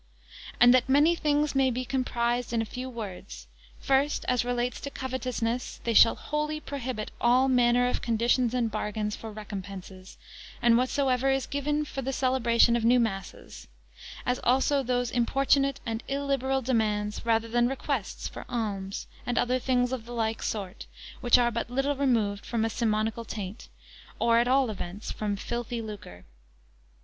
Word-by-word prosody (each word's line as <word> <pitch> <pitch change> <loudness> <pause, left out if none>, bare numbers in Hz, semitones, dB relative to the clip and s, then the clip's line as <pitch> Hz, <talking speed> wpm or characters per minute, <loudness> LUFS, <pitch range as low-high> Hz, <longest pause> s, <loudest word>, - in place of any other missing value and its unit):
And 245 +1 +8
that 255 0 +3
many 295 +5 +5
things 295 -2 +1
may 270 -1 +3
be 255 +1 -3
comprised 245 -2 -1
in 230 - +1
a 225 - 0
few 250 +4 -6
words: 205 -6 -8 0.3
first, 275 +2 +1
as 250 -1 +2
relates 245 0 -1
to 280 - -4
covetousness: 255 -3 -3
they 230 - 0
shall 230 - +7
wholly 300 +1 -3
prohibit 255 -7 -5
all 250 +2 +4
manner 245 -1 +3
of 250 - -1
conditions 235 +1 +1
and 235 -3 0
bargains 210 0 -2
for 225 - -8
recompenses, 195 -3 -8 0.4
and 235 -1 +4
whatsoever 255 +1 +1
is 270 0 +1
given 295 +2 -1
for 270 - -5
the 265 +1 -2
celebration 240 -3 +3
of 235 - 0
new 245 +2 +5
masses; 195 -5 -4 0.6
as 250 0 0
also 270 +3 +3
those 245 -2 -1
importunate 275 +3 +2
and 225 -1 -3
illiberal 275 -1 -1
demands, 210 -4 0
rather 230 -1 +1
than 240 +1 +2
requests, 270 -5 -3
for - - -8
alms, 200 -5 -3 0.2
and 245 0 -2
other 255 +1 +2
things 250 -1 +1
of 240 -3 -4
the 240 - -7
like 225 -1 -1
sort, 195 -4 -4 0.3
which 240 0 +5
are 240 -1 +2
but 235 0 -3
little 270 +3 0
removed 225 -7 +1
from 225 -2 -1
a - - 0
simonical 220 0 -1
taint, 210 -1 -7 0.5
or 235 0 +3
at 240 - +2
all 260 -2 +3
events, 195 +1 -6
from 210 -1 -2
filthy 235 +3 -4
lucre. 205 - -9
240 Hz, 160 wpm, -28 LUFS, 220-260 Hz, 0.6 s, And